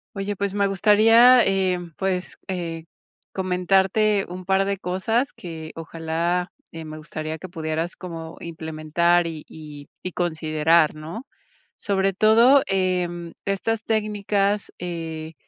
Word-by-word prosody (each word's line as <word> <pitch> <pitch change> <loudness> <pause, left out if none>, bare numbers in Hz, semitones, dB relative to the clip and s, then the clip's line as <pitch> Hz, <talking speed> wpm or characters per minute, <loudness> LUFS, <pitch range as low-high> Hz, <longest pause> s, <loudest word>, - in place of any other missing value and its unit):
Oye, 200 0 -3
pues, 200 0 -2
me 200 -1 +2
gustaría, 225 +5 +6
eh, 190 -2 +1 0.2
pues, 190 -1 -2
eh, 165 -3 -4 0.5
comentarte 195 +2 +2
un 180 0 -8
par 190 0 +3
de 200 -1 -2
cosas 220 +8 -1
que 160 -2 -8
ojalá, 165 +2 -2 0.2
eh, 165 -1 -8
me 155 - -7
gustaría 155 0 -5
que 185 +4 -9
pudieras 160 0 -3
como 165 -3 -8
implementar 165 +1 0
y 160 -2 -6
y 150 -2 -11 0.2
y 185 - -4
considerar, 160 -1 +2
¿no? 165 - -8 0.5
Sobre 195 -1 0
todo, 230 +7 +6
em 180 -3 -1
estas 210 +3 -1
técnicas, 210 -2 0
eh, 165 -2 -5
180 Hz, 125 wpm, -23 LUFS, 165-200 Hz, 0.5 s, gustaría